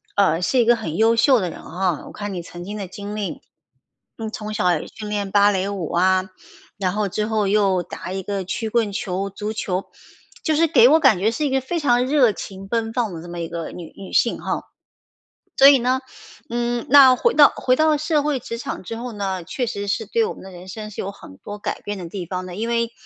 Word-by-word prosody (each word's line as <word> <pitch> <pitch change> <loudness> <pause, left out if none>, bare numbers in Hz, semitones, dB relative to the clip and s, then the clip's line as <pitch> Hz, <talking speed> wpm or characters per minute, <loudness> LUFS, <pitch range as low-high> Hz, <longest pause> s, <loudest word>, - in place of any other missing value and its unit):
呃， 180 -4 +3
是 255 +7 +2
一 235 - +4
个 240 - +5
很 165 -9 -5
优 225 +1 +4
秀 250 +1 +5
的 180 -3 -2
人 - - -9
啊， 180 -2 -2
我 - - -10
看 205 -1 -5
你 175 - -4
曾 175 +1 -9
经 205 +3 -6
的 195 -3 -5
经 205 +3 -7
历， 210 -2 -4 0.8
你 220 -1 -4
从 215 -1 -6
小 180 -5 +2
也 - - -8
训 210 -1 -8
练 205 -2 -2
芭 205 0 +5
蕾 190 0 -1
舞 190 -6 -4
啊， 185 +1 +2 0.5
然 185 -2 -1
后 210 -2 -1
之 210 +3 -1
后 215 -3 0
又 195 -3 +2
打 180 - -8
一 190 0 -4
个 200 -1 -3
曲 220 +4 -3
棍 225 -3 +1
球、 195 0 -3
足 210 +2 -5
球， 190 -3 -2 0.6
就 310 -2 +1
是 330 +2 +4
给 245 -5 +6
我 320 +2 +6
感 260 - +5
觉 215 +4 +2
是 300 +5 -2
一 - - +1
个 265 0 +2
非 335 +6 -3
常 250 -3 +3
热 265 -6 +4
情 195 0 -8
奔 225 0 -1
放 230 -6 -1
的 160 - -7
这 175 - -10
么 175 0 -6
一 165 - -3
个 165 -1 -5
女 170 -3 -9
女 195 - -10
性 235 - +3
哈。 - - -2 1.0
所 275 - +9
以 280 - +7
呢， 255 +2 +1 0.5
嗯， 240 0 -1
那 265 -3 +8
回 475 - +2
到 290 -2 +8
回 255 0 +2
到 310 -1 +3
社 305 0 +1
会 290 -4 -1
职 230 +1 -6
场 230 - -5
之 225 +5 -6
后 240 0 -6
呢， 190 -3 -3
确 255 - -3
实 200 -2 -4
是 220 +2 0
对 460 - +1
我 - - -4
们 - - -13
的 190 - -10
人 180 0 -11
生 215 +2 -7
是 - - -6
有 195 - -3
很 95 - -14
多 205 0 -8
改 - - -4
变 205 0 -5
的 175 -2 -7
地 185 -4 -5
方 185 +1 -4
的， 180 - -8
因 225 +2 -2
为 235 0 0
210 Hz, 265 characters per minute, -22 LUFS, 190-240 Hz, 1.0 s, 所